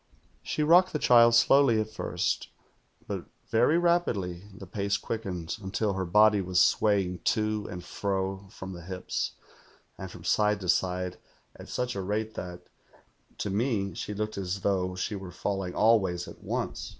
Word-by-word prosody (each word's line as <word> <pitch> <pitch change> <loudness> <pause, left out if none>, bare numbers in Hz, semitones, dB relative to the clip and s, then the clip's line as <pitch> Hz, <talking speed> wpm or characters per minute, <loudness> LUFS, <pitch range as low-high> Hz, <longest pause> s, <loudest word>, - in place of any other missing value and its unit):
"She 150 - -2
rocked 180 +4 +5
the - - +1
child 120 -4 +6
slowly 120 -1 +5
at 110 - -1
first, - - -2 0.6
but - - -5 0.3
very 120 +8 +4
rapidly 115 - 0
the 95 0 -10
pace 100 +2 -1
quickened, 90 -7 -4
until 100 +1 -1
her 95 0 -2
body 105 +3 +5
was 90 -1 +1
swaying 95 -2 +2
to 110 -1 0
and 90 -3 -7
fro 95 +1 -3
from 95 -3 -8
the 85 - -9
hips, 90 +2 -3 0.7
and - - -6
from - - -11
side 105 -1 +2
to 90 - -4
side, 90 0 0 0.4
at - - -12
such 125 0 -2
a 100 - -2
rate 105 +3 -2
that, 90 -3 -7 0.8
to 100 - -3
me, 105 -2 0
she 105 - -5
looked 105 0 -3
as 95 0 -3
though 95 -2 0
she 95 +3 -3
were 95 -2 -7
falling 95 0 -3
all 115 +1 +5
ways 90 -3 -3
at - - -11
once. - - -3
100 Hz, 165 wpm, -28 LUFS, 90-110 Hz, 0.8 s, child